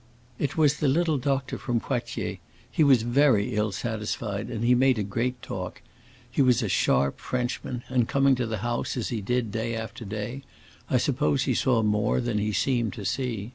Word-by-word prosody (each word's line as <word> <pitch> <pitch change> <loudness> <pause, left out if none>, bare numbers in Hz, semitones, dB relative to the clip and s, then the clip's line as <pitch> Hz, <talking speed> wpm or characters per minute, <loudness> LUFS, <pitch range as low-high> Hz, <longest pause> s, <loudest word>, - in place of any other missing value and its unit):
"It 140 +1 -2
was 150 -2 +4
the 150 - +1
little 155 +1 +2
doctor 135 0 -1
from 120 -2 0
Poitiers. 120 0 -3 0.3
He 160 - +3
was 130 -6 +5
very 120 -3 +3
ill 105 0 +1
satisfied, 110 0 -3
and 115 -2 -3
he 125 - +5
made 130 0 +4
a 105 - 0
great 120 +5 -2
talk. - - -5 0.5
He 125 +3 0
was 125 -3 +4
a - - 0
sharp 70 0 +2
Frenchman, 125 0 -3
and 125 -3 +1
coming 140 0 +3
to 125 -2 -1
the 110 -1 -2
house, 120 +2 -2
as 120 - -2
he 115 -4 -2
did 120 +1 -1
day 115 +2 -2
after 115 +2 -6
day, 110 +5 -5 0.5
I 130 - +3
suppose 135 +1 +1
he - - +1
saw 120 -4 +2
more 105 +1 +1
than 120 -4 -1
he 105 +1 0
seemed 115 +1 0
to 105 -4 -7
see. 115 -1 -2
120 Hz, 195 wpm, -26 LUFS, 110-130 Hz, 0.5 s, was